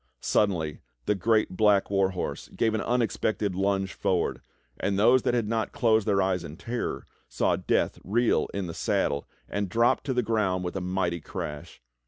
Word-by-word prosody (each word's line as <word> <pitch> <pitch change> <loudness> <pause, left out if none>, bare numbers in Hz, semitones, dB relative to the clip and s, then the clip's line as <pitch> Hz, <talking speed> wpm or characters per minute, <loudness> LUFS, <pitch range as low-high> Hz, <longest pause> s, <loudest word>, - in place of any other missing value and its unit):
Suddenly 85 -8 0 0.2
the - - +2
great 110 +2 +2
black 100 -1 +3
war 95 -1 +3
horse 95 -2 -4
gave 115 -1 +1
an 110 - 0
unexpected 110 -4 0
plunge 95 0 0
forward, 90 -2 0 0.4
and 100 -1 0
those 125 +5 +5
that 120 - +1
had 115 -3 0
not 110 0 -1
closed 110 -6 +2
their 100 -2 +3
eyes 95 -2 0
in 75 +2 -8
terror, 120 +4 -4 0.2
saw - - +1
Death - - 0
reel 115 +5 +2
in 100 -1 -3
the 85 - -5
saddle, 70 -2 0 0.2
and 100 -2 -2
drop 115 +5 +3
to 135 - 0
the 125 - +2
ground 105 -5 0
with 90 +1 -4
a 95 - -2
mighty 90 -2 -1
crash. 75 -4 -7
100 Hz, 180 wpm, -27 LUFS, 95-110 Hz, 0.4 s, those